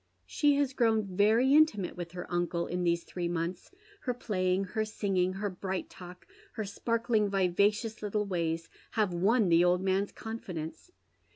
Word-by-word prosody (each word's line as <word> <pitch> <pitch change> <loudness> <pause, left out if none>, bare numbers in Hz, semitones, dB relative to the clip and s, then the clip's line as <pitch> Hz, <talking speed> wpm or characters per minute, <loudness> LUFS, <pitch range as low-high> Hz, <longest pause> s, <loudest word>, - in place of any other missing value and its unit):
She 290 -1 +2
has 280 -2 +1
grown 225 -4 +2
very 225 +7 +4
intimate 290 - +3
with 175 -1 -7
her 180 0 -5
uncle 175 0 0
in 180 +1 -2
these 170 -1 +1
three 175 -1 -4
months, 170 +1 -3 0.3
her 250 -2 -2
playing, 185 -5 0
her 215 +3 -2
singing, 195 -4 0
her 200 +1 -3
bright 185 +1 -4
talk, 180 0 -11 0.3
her 220 -3 -3
sparkling, 225 0 0
vivacious 200 +4 +1
little 210 0 -1
ways 165 -3 -2 0.3
have 210 -5 +1
won 200 +4 +3
the 170 +1 +5
old 180 +1 +3
man's 195 +1 +1
confidence. 185 - -7
195 Hz, 160 wpm, -30 LUFS, 180-220 Hz, 0.3 s, the